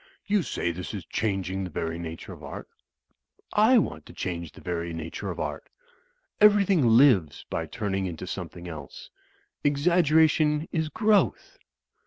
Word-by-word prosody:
"You 205 Hz, -1 st, +2 dB
say 120 Hz, -, -2 dB
this 90 Hz, +5 st, -6 dB
is 95 Hz, -, -6 dB
changing 95 Hz, -3 st, -2 dB
the 90 Hz, -, -5 dB
very 80 Hz, +1 st, -3 dB
nature 80 Hz, -1 st, -7 dB
of -, -, -13 dB
Art. -, -, -8 dB, 0.9 s
I 220 Hz, +5 st, +5 dB
want 80 Hz, -, -1 dB
to -, -, -12 dB
change 85 Hz, -3 st, -4 dB
the -, -, -13 dB
very 85 Hz, -1 st, -4 dB
nature 80 Hz, 0 st, -5 dB
of -, -, -5 dB
Art. -, -, -4 dB, 0.7 s
Everjrthing 200 Hz, -6 st, +5 dB
lives 105 Hz, -, +4 dB
by 80 Hz, -1 st, -2 dB
turning 95 Hz, 0 st, -2 dB
into 85 Hz, -3 st, -6 dB
something 90 Hz, 0 st, -7 dB
else. 75 Hz, -5 st, -9 dB, 0.5 s
Exaggeration 155 Hz, 0 st, +3 dB
is 160 Hz, -2 st, -1 dB
growth." 210 Hz, +5 st, +1 dB
100 Hz, 145 wpm, -26 LUFS, -, 0.9 s, I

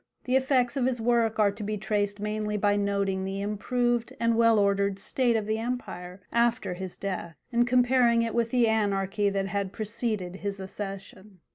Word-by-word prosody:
The 255 Hz, 0 st, 0 dB
effects 260 Hz, -2 st, +2 dB
of 255 Hz, -2 st, +2 dB
his 250 Hz, -2 st, -1 dB
work 230 Hz, -1 st, +2 dB
are 210 Hz, -2 st, +4 dB
to 205 Hz, +2 st, -10 dB
be 210 Hz, +1 st, -2 dB
traced 205 Hz, 0 st, -1 dB
mainly 210 Hz, 0 st, -2 dB
by 205 Hz, 0 st, +2 dB
noting 200 Hz, -1 st, 0 dB
the 195 Hz, +1 st, -3 dB
improved 235 Hz, +4 st, -1 dB
and 230 Hz, 0 st, +2 dB
well 230 Hz, -1 st, +5 dB
ordered 200 Hz, -1 st, +2 dB
state 240 Hz, +3 st, +1 dB
of 220 Hz, -2 st, 0 dB
the 220 Hz, +1 st, -1 dB
empire 190 Hz, -6 st, -5 dB
after 235 Hz, -4 st, +1 dB
his 185 Hz, 0 st, -6 dB
death, 185 Hz, -4 st, -4 dB, 0.2 s
and 240 Hz, 0 st, +2 dB
comparing 245 Hz, -1 st, +4 dB
it 230 Hz, -, -2 dB
with 235 Hz, -1 st, +1 dB
the 245 Hz, -1 st, +3 dB
anarchy 205 Hz, -2 st, +1 dB
that 195 Hz, -1 st, -1 dB
had 195 Hz, -1 st, -2 dB
preceded 215 Hz, -4 st, -2 dB
his 200 Hz, 0 st, -4 dB
accession. 195 Hz, -1 st, -7 dB
210 Hz, 180 wpm, -27 LUFS, 200-235 Hz, 0.2 s, well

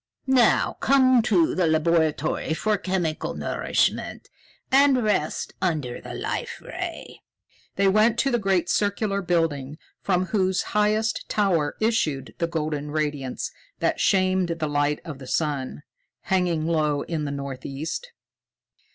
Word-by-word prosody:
Now 260 Hz, -3 st, +3 dB
come 260 Hz, -2 st, +5 dB
to 190 Hz, -8 st, +2 dB
the 180 Hz, -2 st, +1 dB
laboratory 160 Hz, -1 st, +1 dB
for 215 Hz, +5 st, +1 dB
chemical 180 Hz, -5 st, -2 dB
nourishment -, -, -1 dB, 0.4 s
and 270 Hz, -2 st, +5 dB
rest 200 Hz, -8 st, -1 dB
under 150 Hz, -9 st, -1 dB
the -, -, -8 dB
Life -, -, -4 dB
Ray." -, -, -7 dB, 0.5 s
They 200 Hz, 0 st, +3 dB
went 215 Hz, +4 st, +4 dB
to 275 Hz, -, 0 dB
the 240 Hz, -, +2 dB
great 190 Hz, -4 st, +1 dB
circular 200 Hz, +1 st, 0 dB
building 160 Hz, -6 st, -1 dB, 0.2 s
from 185 Hz, -1 st, +1 dB
whose 190 Hz, -2 st, +1 dB
highest 215 Hz, +1 st, +1 dB
tower 175 Hz, -8 st, +1 dB
issued 165 Hz, -, 0 dB
the 170 Hz, -, +1 dB
golden 150 Hz, -3 st, -3 dB
radiance 145 Hz, -4 st, -2 dB, 0.3 s
that -, -, 0 dB
shamed 185 Hz, -2 st, +2 dB
the 155 Hz, -, -2 dB
light 145 Hz, 0 st, 0 dB
of 150 Hz, -4 st, -7 dB
the 130 Hz, -, -10 dB
sun, 145 Hz, -2 st, -2 dB, 0.4 s
hanging 175 Hz, -4 st, 0 dB
low 155 Hz, -3 st, +1 dB
in 160 Hz, -3 st, -3 dB
the 140 Hz, -, -3 dB
northeast. 140 Hz, -, -5 dB
170 Hz, 130 wpm, -24 LUFS, 150-205 Hz, 0.5 s, come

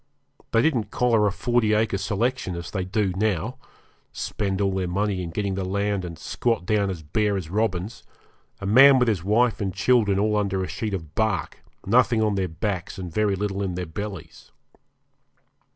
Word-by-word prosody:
They 115 Hz, -1 st, +3 dB
didn't 120 Hz, -10 st, +1 dB
collar 115 Hz, -4 st, +2 dB
a -, -, +1 dB
40 110 Hz, +2 st, +1 dB
acre 105 Hz, -2 st, +1 dB
selection, 105 Hz, 0 st, -1 dB
as 85 Hz, 0 st, -6 dB
they 95 Hz, -3 st, -2 dB
do 100 Hz, 0 st, -1 dB
now 110 Hz, +5 st, -1 dB, 0.5 s
spend 100 Hz, -2 st, -3 dB
all 100 Hz, -1 st, +1 dB
their 95 Hz, -1 st, -1 dB
money 100 Hz, +1 st, -1 dB
in 85 Hz, -, -4 dB
getting 100 Hz, +3 st, -2 dB
the 95 Hz, 0 st, -2 dB
land 100 Hz, +1 st, -1 dB
and 85 Hz, -2 st, -7 dB
squat 115 Hz, -1 st, -1 dB
down 100 Hz, 0 st, +1 dB
as 85 Hz, -4 st, -5 dB
bare 100 Hz, +6 st, 0 dB
as 85 Hz, -3 st, -6 dB
robins 105 Hz, 0 st, -1 dB, 0.6 s
a 100 Hz, -, -6 dB
man 135 Hz, +7 st, +7 dB
with 125 Hz, -1 st, +3 dB
his 100 Hz, -7 st, 0 dB
wife 110 Hz, +4 st, +2 dB
and 95 Hz, -2 st, -1 dB
children 100 Hz, +1 st, +2 dB
all 105 Hz, +1 st, +1 dB
under 95 Hz, -2 st, 0 dB
a -, -, -3 dB
sheet 105 Hz, -3 st, -3 dB
of 80 Hz, -5 st, -8 dB
bark, 110 Hz, -1 st, -1 dB, 0.3 s
nothing 120 Hz, +2 st, +3 dB
on 110 Hz, -1 st, +2 dB
their 95 Hz, -2 st, 0 dB
backs, 90 Hz, +3 st, -4 dB
and 90 Hz, -4 st, -6 dB
very 105 Hz, -1 st, +1 dB
little 100 Hz, 0 st, -2 dB
in 95 Hz, -3 st, -2 dB
their 90 Hz, 0 st, -3 dB
bellies. 95 Hz, +1 st, -8 dB
100 Hz, 185 wpm, -24 LUFS, 95-110 Hz, 0.6 s, man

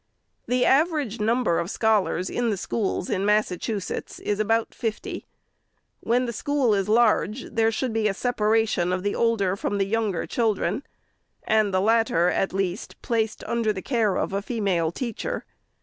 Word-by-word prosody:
The 250 Hz, 0 st, +2 dB
average 285 Hz, -, +2 dB
number 225 Hz, -4 st, +1 dB
of 170 Hz, -, -3 dB
scholars 205 Hz, -5 st, +1 dB
in 240 Hz, +3 st, -1 dB
the 205 Hz, -, -1 dB
schools 190 Hz, -1 st, -2 dB
in 190 Hz, -, -1 dB
Mas 210 Hz, +1 st, +3 dB
sachusetts 190 Hz, +2 st, -4 dB
is 205 Hz, 0 st, -1 dB
about 225 Hz, +2 st, +1 dB
fifty. 225 Hz, -2 st, -4 dB, 0.7 s
When 245 Hz, +2 st, +1 dB
the 235 Hz, -, -3 dB
school 270 Hz, 0 st, +1 dB
is 195 Hz, 0 st, 0 dB
large, 230 Hz, +1 st, +3 dB
there 225 Hz, -1 st, +2 dB
should 235 Hz, +1 st, -2 dB
be 220 Hz, -1 st, +1 dB
a 200 Hz, -, 0 dB
separation 220 Hz, -6 st, +1 dB
of 185 Hz, 0 st, -1 dB
the 205 Hz, -, 0 dB
older 210 Hz, -5 st, +1 dB
from 200 Hz, +1 st, -2 dB
the 195 Hz, -, +1 dB
younger 210 Hz, -3 st, -1 dB
children, 215 Hz, -2 st, 0 dB, 0.6 s
and 215 Hz, -2 st, +2 dB
the 185 Hz, 0 st, +2 dB
latter, 220 Hz, -5 st, +3 dB
at 195 Hz, -, 0 dB
least, 195 Hz, +1 st, -3 dB
placed 225 Hz, -3 st, -1 dB
under 230 Hz, -2 st, 0 dB
the 190 Hz, -3 st, -5 dB
care 225 Hz, -7 st, +1 dB
of -, -, -2 dB
a 200 Hz, -, 0 dB
female 195 Hz, -8 st, 0 dB
teacher. 255 Hz, -, -4 dB
215 Hz, 165 wpm, -25 LUFS, 195-230 Hz, 0.7 s, Mas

